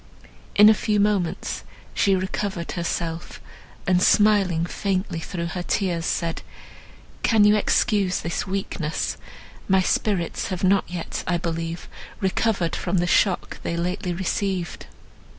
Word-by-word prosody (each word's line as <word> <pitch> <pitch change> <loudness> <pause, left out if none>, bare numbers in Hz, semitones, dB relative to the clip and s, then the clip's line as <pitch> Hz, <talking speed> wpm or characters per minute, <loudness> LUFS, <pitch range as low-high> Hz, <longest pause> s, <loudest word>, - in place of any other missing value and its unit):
In 210 +1 +8
a 220 - +8
few 210 -1 0
moments, 200 -4 0 0.3
she 195 -2 +3
recovered 190 -1 -3
herself, 170 -1 -3 0.5
and 180 -1 +3
smiling 195 -6 +4
faintly 185 -1 -2
through 170 0 -4
her 180 - -3
tears, 175 -2 -1
said, 165 -1 -1 0.8
"Can 220 -2 +4
you 210 +1 +6
excuse 205 -3 +2
this 170 +4 -3
weakness? 185 -5 -2 0.5
My 190 -1 +4
spirits 185 -3 0
have 185 -1 -4
not 195 +1 +4
yet, 175 -2 -4
I 175 - +2
believe, 165 0 -4 0.3
recovered 190 -3 0
from 190 - -1
the 175 - +2
shock 180 +1 +1
they 170 - -3
lately 180 +2 -2
received." 185 0 -2
185 Hz, 130 wpm, -24 LUFS, 170-200 Hz, 0.8 s, In